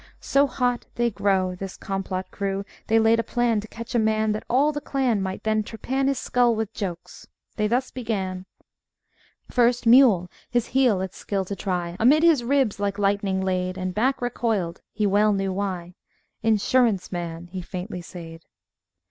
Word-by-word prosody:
So 280 +1 +2
hot 245 -2 -1
They 240 0 +1
grew, 195 -3 +1
This 190 +1 -7
complot 190 -1 -4
Crew, 195 0 -3 0.2
They 225 - +3
laid 225 +1 +4
a - - +1
plan 240 -2 +1
To 210 - -7
catch 230 +1 -8
a 240 - +3
Man; 220 0 +2
That 210 - -3
all 280 +5 +3
the 295 0 -4
clan 255 -8 0
Might 190 0 -4
then 215 0 +1
trepan 260 +5 -2
His 275 -1 +1
skull 245 -2 +2
with 220 0 -3
Jokes; 180 -5 -6 0.3
they 210 -1 +1
thus 250 +4 0
began: 190 -6 -3 1.0
First 245 -1 +2
Mule, 230 -7 +6 0.2
his 240 -1 +1
heel 245 -7 +3
its 190 -1 -5
skill 195 -2 -2
to 200 - -4
try, 180 -2 -3
Amid 285 +8 +5
his 320 -7 +5
ribs 260 -5 +1
like 200 0 -1
lightning 200 -1 +1
laid 185 -1 -1
And 185 0 -3
back 250 +5 0
recoiled 220 -8 -1
he 210 0 -1
well 205 +1 +3
knew 195 -1 -1
why; 185 -3 -3 0.5
"Insurance 220 -2 +2
Man," 170 -1 -5
he 185 0 -4
faintly 180 +1 -6
sayed. 165 -2 -10
210 Hz, 175 wpm, -24 LUFS, 190-240 Hz, 1.0 s, Mule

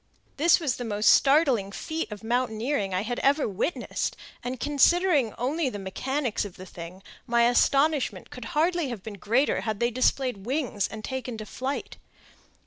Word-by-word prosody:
This 330 +4 +5
was 295 -7 -1
the 245 - -4
most 210 -2 +3
startling 270 -9 +4
feat 315 +6 -4
of 210 +1 -8
mountaineering 230 -1 -1
I 185 +1 0
had 240 +2 -3
ever 280 +2 +2
witnessed, 210 - -2 0.3
and, 250 0 -4
considering 295 - +3
only 275 +4 0
the 210 - -6
mechanics 245 +6 -2
of 205 -4 -8
the 185 - -9
thing, 180 +1 -10 0.2
my 235 -1 +4
astonishment 280 +4 +2
could 250 -2 -8
hardly 335 -2 +2
have 225 -6 -6
been 205 -3 -8
greater 235 +9 +1
had 215 -3 -3
they 235 0 +1
displayed 255 0 +1
wings 255 -7 -1
and 220 -1 -9
taken 255 -3 -4
to 215 - -6
flight. 265 +5 -4
245 Hz, 165 wpm, -26 LUFS, 215-285 Hz, 0.3 s, This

